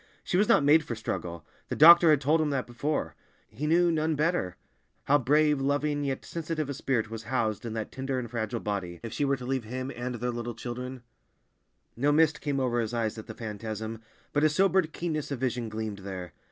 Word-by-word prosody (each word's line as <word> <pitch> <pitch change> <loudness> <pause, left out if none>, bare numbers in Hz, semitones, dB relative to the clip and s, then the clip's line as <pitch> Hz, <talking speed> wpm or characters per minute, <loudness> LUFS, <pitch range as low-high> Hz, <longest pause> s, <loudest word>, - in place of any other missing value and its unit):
She - - -2
was 205 +3 +4
not 145 - +5
made 150 +3 +5
for 120 -6 -4
struggle; 85 -6 -5 0.2
the - - -2
doctor 170 +2 +9
had 150 -3 +5
told 150 +4 +2
him 155 - +1
that 135 -3 -1
before. 140 +5 -2 0.4
He 135 +8 -4
knew, 170 +2 +4
none 160 0 +1
better! 150 - 0 0.5
how 145 +1 +4
brave, 150 +2 +3
loving, 145 +1 0
yet 135 -2 -3
sensitive 155 -3 -3
a - - -3
spirit 120 -5 -1
was 115 -1 -6
housed 115 -3 -1
in 110 - -4
that 110 -1 -4
tender 135 0 -3
and 125 -2 -3
fragile 115 0 -3
body. 95 -5 -3
If 115 - -6
she 145 - 0
were 140 0 +1
to 125 - -8
leave 130 -2 -2
him 130 +4 -4
and 125 +1 -4
their 120 +1 -2
little 120 -1 -5
children— 125 +1 -6 0.9
No 140 +5 +2
mist 155 0 +3
came 145 -2 -1
over 125 -2 +1
his 115 +1 -2
eyes 115 -1 -1
at 110 - -10
the - - -8
phantasm, 110 0 -5 0.3
but 145 - +2
a 155 - +6
sobered 185 0 +2
keenness 155 -2 -3
of 140 - -3
vision 125 -3 -1
gleamed 110 -2 -4
there. 95 -3 -7
130 Hz, 215 wpm, -28 LUFS, 115-150 Hz, 0.9 s, doctor